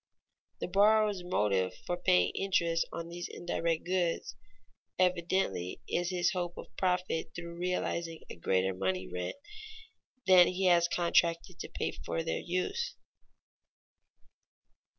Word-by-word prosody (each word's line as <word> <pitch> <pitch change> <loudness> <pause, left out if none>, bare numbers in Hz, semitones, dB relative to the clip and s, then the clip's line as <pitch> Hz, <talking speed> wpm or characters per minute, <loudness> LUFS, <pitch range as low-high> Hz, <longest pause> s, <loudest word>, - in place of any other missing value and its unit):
The - - -1
borrower's 205 0 +4
motive 100 - +1
for 175 - -1
paying 90 - +3
interest 170 -4 +1
on 170 0 -5
these 175 +1 -5
indirect 170 -2 -2
goods 175 -9 -1 0.6
evidently 180 - 0
is 175 0 0
his 175 -1 +1
hope 175 -2 -3
of - - -10
profit 180 -3 -1
through 170 0 -7
realizing 170 -2 -2
a - - -8
greater 95 +2 +1
money 95 0 -1
rent 90 -1 -4 0.9
than 185 -2 +8
he 185 +1 -1
has 175 -2 +5
contracted 170 -1 +1
to - - -6
pay - - -2
for 80 0 -4
their 80 - -1
use. 185 - -2
175 Hz, 125 wpm, -31 LUFS, 155-180 Hz, 0.9 s, than